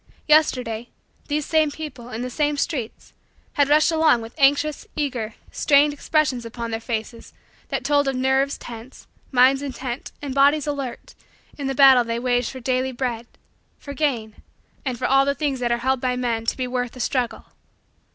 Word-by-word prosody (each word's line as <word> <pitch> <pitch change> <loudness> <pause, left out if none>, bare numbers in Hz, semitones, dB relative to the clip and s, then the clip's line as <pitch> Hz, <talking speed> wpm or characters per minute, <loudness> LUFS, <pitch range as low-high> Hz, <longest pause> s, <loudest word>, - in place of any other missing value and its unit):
Yesterday, 250 -7 +2 0.4
these 295 0 -1
same 315 -2 +2
people, 290 -5 -8
in 235 0 -5
the 250 - -4
same 295 +1 0
streets, 275 -7 -4 0.4
had 285 -1 +2
rushed 305 +3 +4
along 320 -6 +4
with 225 0 -9
anxious, 285 +2 +2
eager, 245 -7 -3 0.2
strained, 290 0 +3
expressions 290 -4 0
upon 230 0 -6
their 225 - -2
faces 230 0 -5 0.4
that - - -2
told 285 0 +2
of 270 - 0
nerves 265 +2 +1
tense, 235 +2 -11 0.3
minds 260 +1 +5
intent, 260 -2 -5
and 280 -2 -5
bodies 280 +2 +4
alert, 275 -5 -5 0.4
in 280 -2 -4
the 270 - -2
battle 265 -2 +7
they 230 0 -3
waged 245 -1 0
for 260 - -8
daily 255 +1 -1
bread, 240 -2 -3 0.5
for 280 - -9
gain, 250 -8 -2 0.5
and 255 -3 -2
for - - -3
all 270 +1 +4
the 280 +1 0
things 280 -4 -1
that 240 -1 -1
are 235 - +2
held 265 -1 +1
by 250 -1 0
men 235 -2 -2
to - - 0
be 255 - -1
worth 250 -1 -3
the 255 - -11
struggle. 245 0 -2
260 Hz, 180 wpm, -22 LUFS, 240-285 Hz, 0.5 s, battle